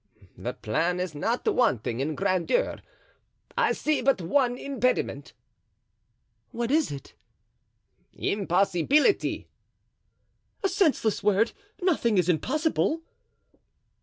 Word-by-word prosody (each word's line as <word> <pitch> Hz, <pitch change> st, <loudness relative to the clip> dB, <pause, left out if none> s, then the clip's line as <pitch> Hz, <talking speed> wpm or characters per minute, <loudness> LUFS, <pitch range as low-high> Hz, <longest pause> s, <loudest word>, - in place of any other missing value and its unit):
"The -, -, -5 dB
plan 170 Hz, +12 st, -1 dB
is 180 Hz, -3 st, -3 dB
not 225 Hz, +12 st, -2 dB
wanting 125 Hz, -, +1 dB
in 150 Hz, +3 st, -1 dB
grandeur; 195 Hz, -, 0 dB, 0.8 s
I 480 Hz, -2 st, +2 dB
see 305 Hz, -1 st, 0 dB
but 270 Hz, -3 st, +2 dB
one 245 Hz, +8 st, +1 dB
impediment." 255 Hz, -2 st, -1 dB, 1.2 s
"What 235 Hz, 0 st, -3 dB
is 310 Hz, -, +2 dB
it?" 140 Hz, -2 st, -8 dB, 1.0 s
"Impossibility." 200 Hz, -, +1 dB, 1.2 s
"A 390 Hz, -, +2 dB
senseless 315 Hz, -, +1 dB
word. 210 Hz, +3 st, +2 dB, 0.3 s
Nothing 240 Hz, -, +2 dB
is 180 Hz, -1 st, +2 dB
impossible." 310 Hz, -, 0 dB
230 Hz, 95 wpm, -27 LUFS, 180-300 Hz, 1.2 s, I